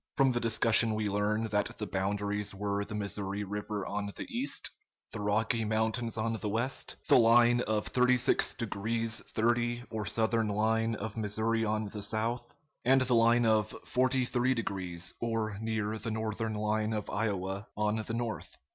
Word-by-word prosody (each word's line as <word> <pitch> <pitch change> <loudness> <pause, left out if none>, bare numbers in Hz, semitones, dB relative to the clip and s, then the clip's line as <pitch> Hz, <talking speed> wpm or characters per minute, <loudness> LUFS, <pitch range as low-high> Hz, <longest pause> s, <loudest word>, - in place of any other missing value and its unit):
From 135 -2 +5
the 120 - 0
discussion 115 -1 +4
we 105 -1 -1
learn 105 +2 0
that 105 -1 0
the 105 - -3
boundaries 100 +1 -2
were 100 0 -1
the 105 +1 -6
Missouri 100 -1 -3
River 105 0 -4
on 100 0 -3
the - - -5
east, 265 +4 -1 0.4
the 110 - -4
Rocky 110 +3 +1
Mountains 110 +2 -1
on 110 +1 0
the 105 0 -3
west, 120 +5 -1
the - - +7
line 120 +1 +5
of 105 -1 0
36 125 -1 +3
degrees 115 0 -1 0.2
30' 120 +1 +1
or 110 -3 -3
southern 115 0 +1
line 110 +2 +1
of 110 +1 -6
Missouri 110 +2 0
on 110 0 -1
the 105 0 -6
south, 115 +4 -2 0.3
and 135 +1 +5
the 130 -1 +2
line 115 +1 +4
of 110 -1 +2
43 130 0 +1
degrees, 90 -6 -3
or 115 -2 -1
near 110 -1 -1
the 115 - -3
northern 110 0 -2
line 105 +1 0
of 105 -1 -3
Iowa, 100 -1 -2
on 105 +1 +1
the 110 +1 -4
north. 115 -2 -4
110 Hz, 165 wpm, -31 LUFS, 105-115 Hz, 0.4 s, the